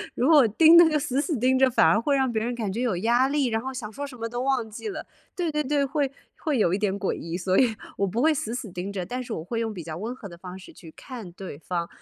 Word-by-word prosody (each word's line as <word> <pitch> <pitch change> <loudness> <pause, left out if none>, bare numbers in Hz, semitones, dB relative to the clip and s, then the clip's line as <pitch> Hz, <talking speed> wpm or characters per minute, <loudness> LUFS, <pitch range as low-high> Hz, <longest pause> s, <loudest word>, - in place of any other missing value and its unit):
如 250 - +1
果 295 -7 +7
盯 320 +10 +6
那 340 -1 +8
个 305 - +1
死 275 -1 -1
死 310 -4 -2
盯 260 +3 +2
着， 265 - +5
反 245 - +4
而 165 +7 +4
会 280 +3 +1
让 265 -2 +1
别 220 -1 -1
人 240 +1 -2
感 215 -5 -3
觉 235 - -2
有 225 -8 0
压 240 +7 +3
力， 285 0 +1
然 225 -2 0
后 265 +1 -5
想 220 -5 -7
说 285 0 -5
什 265 - -11
么 230 0 -3
都 240 +1 -4
忘 260 -4 0
记 420 - -6
了。 - - -6 0.3
对 345 -3 -1
对 300 0 0
对， 285 0 +1
会 275 0 -1 0.2
会 305 -5 -1
有 180 -6 +2
一 195 - 0
点 200 -2 0
诡 195 - -1
异， 170 +2 -5
所 185 0 +1
以 240 -4 +3 0.2
我 200 - +1
不 225 +7 -1
会 315 0 +5
死 235 -4 -3
死 220 -6 -6
盯 180 +3 -5
着， 185 -3 -4
但 250 +5 -4
是 235 -2 -6
我 160 - -4
会 230 +6 -3
用 225 -1 -1
比 180 -5 -7
较 155 -1 -6
温 225 +8 -5
和 210 - -9
的 175 - -11
方 180 +1 -9
式 190 - -13
去 165 -3 -13
看 235 -9 -9
对 180 -6 -8
方， 170 -1 -3
235 Hz, 325 characters per minute, -25 LUFS, 195-270 Hz, 0.3 s, 那